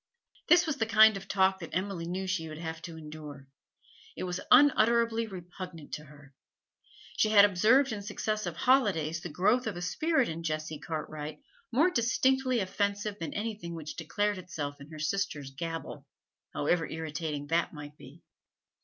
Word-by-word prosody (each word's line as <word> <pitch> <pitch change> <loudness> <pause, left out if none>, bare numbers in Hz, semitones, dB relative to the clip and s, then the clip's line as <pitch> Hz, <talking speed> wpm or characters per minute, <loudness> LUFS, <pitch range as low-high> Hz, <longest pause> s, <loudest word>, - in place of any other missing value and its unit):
This 350 0 +6
was 310 -3 -2
the 225 - 0
kind 220 -1 +7
of 195 0 -7
talk 190 -1 +2
that 165 -2 -7
Emily 185 -2 -2
knew 185 +2 -3
she 185 -4 -2
would 155 - -8
have 160 0 -5
to 165 0 -8
endure; 150 -3 -9 0.7
it - - -4
was 180 0 -3
unutterably 235 -4 +5
repugnant 180 -4 -9
to 150 - -5
her. 145 -1 -16 0.8
She 215 - +3
had 205 -1 +8
observed 220 +8 +4
in 210 -2 -4
successive 215 +1 -3
holidays 185 - +2
the 175 - -6
growth 210 +10 +2
of 205 -5 -3
a - - -5
spirit 310 - +1
in 165 +1 -5
Jessie 155 -1 -3
Cartwright 155 - -6 0.3
more 310 +10 +4
distinctly 255 0 +2
offensive 200 +2 -2
than 165 - -5
anything 205 -6 -4
which 155 -2 -7
declared 205 +5 -1
itself 145 -5 -6
in 140 - -11
her 155 - -9
sisters' 155 -4 -2
gabble, 165 +4 -6 0.4
however 165 +3 0
irritating 155 -2 -4
that 165 +1 +1
might 150 -1 -9
be. 145 +3 -15
180 Hz, 160 wpm, -30 LUFS, 155-215 Hz, 0.8 s, had